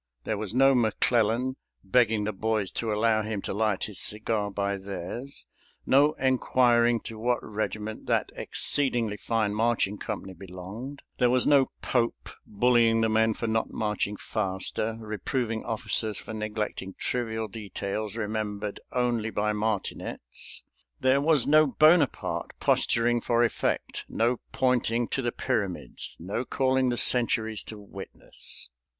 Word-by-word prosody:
There 110 - -1
was 110 +1 -5
no 135 +1 +6
McClellan 120 +1 +2 0.3
begging 110 +1 +3
the 105 +1 -2
boys 110 0 -1
to 115 -2 -2
allow 110 +1 +2
him 110 -1 -3
to - - -3
light 105 -1 0
his 105 - -4
cigar 105 -1 +2
by 100 0 -1
theirs; 100 +8 -5 0.4
no 145 +3 +5
inquiring 120 -2 +3
to 110 -1 -8
what 120 +2 +2
regiment 110 0 -4
that - - +1
exceedingly 120 -7 +1
fine 110 -1 0
marching 110 -2 +1
company 100 -3 -5
belonged; 95 +9 -8 0.2
there 125 -2 +4
was 125 0 +3
no 140 -2 +5
Pope 120 -2 0 0.2
bullying 115 +1 +3
the 110 - +2
men 110 0 +3
for - - -4
not 110 0 0
marching 105 -1 -1
faster, 110 +2 -2
reproving 110 +1 -2
officers 110 -1 -2
for 110 - -8
neglecting 105 -3 -4
trivial 110 -3 -2
details 105 0 -5
remembered 105 -1 -3
only 120 -3 0
by 105 0 0
martinets; 105 -1 -4 0.4
there 130 +2 +3
was 150 -3 +4
no 155 +1 +6
Bonaparte 155 +1 +3
posturing 120 0 +2
for 120 +1 +2
effect; 115 - -1
no 120 +2 +1
pointing 120 -2 +1
to 135 - -1
the 120 -2 -1
pyramids, 110 -10 -3
no 100 +8 -3
calling 130 0 +1
the 120 - -1
centuries 110 -3 +3
to 110 - -9
witness. 100 -1 -9
110 Hz, 135 wpm, -27 LUFS, 105-120 Hz, 0.4 s, no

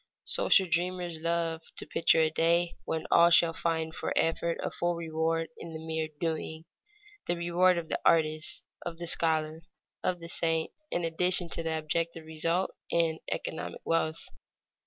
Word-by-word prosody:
Social 190 -2 +4
dreamers 175 -1 -1
love 165 0 -1 0.2
to - - -1
picture 165 0 +3
a 155 -1 +2
day 170 +2 +2
when 160 -1 -2
all 170 - +7
shall 170 -1 +5
find 160 -1 -1
for - - -3
effort 165 +1 +1
a - - -2
full 175 0 -1
reward 165 0 -1
in 165 - -8
the 160 - -5
mere 160 0 -3
doing, 160 -1 -3 0.6
the 175 - +1
reward 175 +1 +3
of 170 -1 -3
the - - -2
artist, 155 -1 +2 0.2
of 170 -1 -5
the 170 - -4
scholar, 160 -1 +1 0.4
of 185 - +1
the 170 -1 -9
saint, 165 -1 0 0.2
in 175 - -1
addition 180 +1 +2
to - - -2
the 160 -1 -1
objective 165 +1 -2
result 165 +3 0 0.2
in 165 -1 +1
economic - - -4
wealth. 165 -1 0
165 Hz, 160 wpm, -29 LUFS, 160-170 Hz, 0.6 s, all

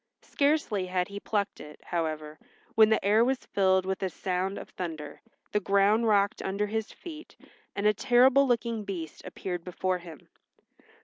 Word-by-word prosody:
Scarcely 280 -10 +1
had 180 0 -1
he 200 0 -6
plucked 205 -1 -2
it, 150 0 -11
however, 155 -2 -3 0.3
when 220 -1 +6
the 220 - +1
air 215 +3 +5
was 260 +1 0
filled 190 -1 +2
with 190 0 -2
a 190 - 0
sound 185 +2 -2
of - - -8
thunder, 155 -5 -6 0.3
the 210 - +2
ground 200 +3 +3
rocked 200 -2 +2
under 200 +2 -1
his 220 +1 -3
feet, 315 -3 -10 0.4
and 200 - -2
a 210 - +5
terrible 260 +4 +5
looking 235 -2 0
beast 175 -6 -6
appeared 180 -2 -5
before 185 +1 -2
him. 170 -2 -12
200 Hz, 165 wpm, -28 LUFS, 180-220 Hz, 0.4 s, when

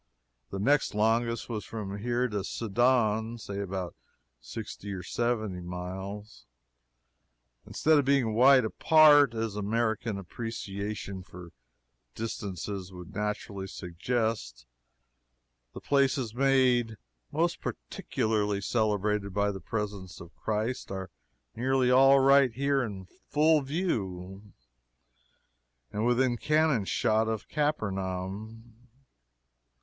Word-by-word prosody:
The - - -5
next 140 +4 +2
longest 115 +2 +1
was 110 -3 -4
from 100 -3 -6
here 120 +3 0
to 105 -4 -3
Sidon 115 +1 +1
say 100 -3 -6
about 95 -3 -4 0.4
sixty 100 +10 -7
or 90 -2 -6
seventy 110 -4 -1
miles. 95 +4 -7 1.2
Instead 155 -1 +3
of 140 - 0
being 135 -5 +2
wide 130 +2 +6
apart 145 0 +6
as 110 -2 -2
American 110 +1 -1
appreciation 100 -1 -5
of 90 -2 -10 0.6
distances 100 -3 -5
would 90 -2 -10
naturally 105 -2 -3
suggest 90 - -3 1.1
the - - -7
places 135 -4 +1
made 125 -3 +2 0.3
most 165 +3 0
particularly 105 - -2
celebrated 105 -2 0
by 100 0 +2
the 95 - -7
presence 100 -6 -5
of 85 0 -12
Christ 110 +4 -2
are 95 -2 -5 0.4
nearly 130 0 +2
all 135 +2 +7
right 135 -1 +5
here 140 +3 +1
in 100 -6 -5 0.2
full 155 +1 +4
view, 100 - -3 1.4
and 110 +3 -1
within 125 0 +2
cannon 150 -6 +2
shot 110 +1 +1
of 110 -2 -3
Capernaum. 110 -4 -3
110 Hz, 105 wpm, -29 LUFS, 100-125 Hz, 1.4 s, all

